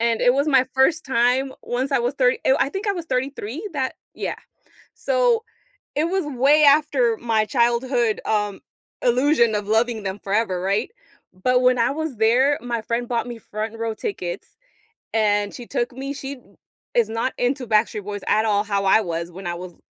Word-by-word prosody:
and 230 -1 +1
it 245 - +5
was 280 +3 +1
my 265 -3 +5
1st 310 +5 +3
time 260 +1 +1
Once 260 +3 -2
I - - +4
was 245 +3 -1
30 255 -2 +2
I - - +4
w 270 - +2
I 275 - -6
think 390 +2 -5
I 400 - +3
was 345 -3 -5
33 265 - -3
that 265 -2 -2 0.2
Yeah, - - -4 0.6
so, - - +1 0.5
it 300 - +1
was 370 0 -1
way 290 +2 +3
after 280 -5 +4
my 220 -2 +1
childhood, 240 -1 +1
um, 210 -2 -1 0.4
illusion 245 -2 +3
of 205 -1 -3
loving 225 0 +1
them 190 +1 -4
forever, 200 -2 -1
right? 200 - 0 0.4
But 250 +7 +1
when 250 -1 +3
I 230 - +2
was 310 -4 -4
there, 255 +6 +3
my 235 -2 -3
friend 235 +2 -2
bought 235 -2 -1
me 240 -1 -6
front-row 225 +1 -4
tickets, 180 -5 -5 0.6
and 205 -2 +1
she 245 - -8
took 240 - -2
me 270 +2 -5
She 275 0 -6
b - - -20 0.5
is 235 -3 +3
not 230 +3 -2
into 250 +1 0
Backstreet 215 -1 +1
Boys 205 -1 -5
at 215 - +3
all 205 -1 +2
how 200 -1 -1
I 195 - +5
was 170 -2 -4
when 185 +1 -8
I 175 - -2
was, 175 0 -9
240 Hz, 190 wpm, -22 LUFS, 215-270 Hz, 0.6 s, it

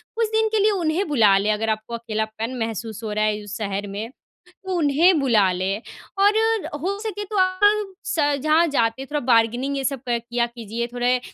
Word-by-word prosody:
कुछ 455 0 +1
दिन 440 0 +2
के 435 - +3
लिए 420 +1 +4
उन्हें 350 -1 0
बुला 215 -9 +5
लें 205 +2 +1
अगर 220 +1 -2
आपको 215 +2 -3
अकेलापन 220 +1 -4
महसूस 225 -1 -4
हो 215 - -3
रहा 215 0 +1
है 210 0 -1
उस 205 0 -7
शहर 205 -1 -3
में। 205 +3 -5 0.4
तो 380 +1 -7
उन्हें 320 +3 +4
बुला 220 -9 +3
लें, 190 +3 -2 0.4
और 400 +1 +5
र 445 -1 +1
हो 390 +4 -1
सके 415 -1 -4
तो 420 +1 -4
आप 390 +2 +2
स 300 -7 +1
जहाँ 315 +2 +4
जाते, 260 -2 0
थोड़ा 295 +2 -2
बारगेनिंग 240 +5 +1
ये 270 - -2
सब 270 -1 -2
क 235 -1 +1
किया 240 0 +1
कीजिए, 235 -1 -5
थोड़े 245 +1 +1
245 Hz, 200 wpm, -22 LUFS, -, 0.4 s, बुला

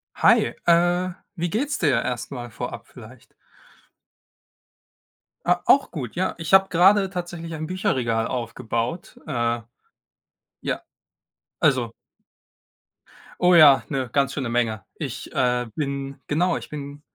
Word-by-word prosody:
Hi, - - +4
äh, 175 +1 +3 0.2
wie 170 -1 -2
geht's 275 - -1
dir 135 -8 +2
erst 125 +1 -4
mal 120 -3 -6
vorab 125 +3 -6
vielleicht? 120 0 -15 2.1
Ah, 175 0 +2
auch 275 - +4
gut, 130 -9 -6
ja. 185 +2 -1
Ich 165 +1 -4
habe 190 0 +7
gerade 195 +3 +4
tatsächlich 175 -2 -6
ein 155 0 -4
Bücherregal 120 -11 0
aufgebaut, 115 +4 -4
äh. 120 -4 -1 1.0
Ja, - - -2 0.8
Also 130 -7 +2 1.5
Oh 180 0 +6
ja, 150 -5 +7
'ne 130 -4 -2
ganz 140 -1 +1
schöne 130 -4 -3
Menge. 115 -4 0
Ich, - - -6
äh, 125 -1 +1
bin 140 -1 -4
genau, 170 +3 +1
ich - - -8
bin 145 -1 -8
140 Hz, 120 wpm, -23 LUFS, 125-175 Hz, 2.1 s, habe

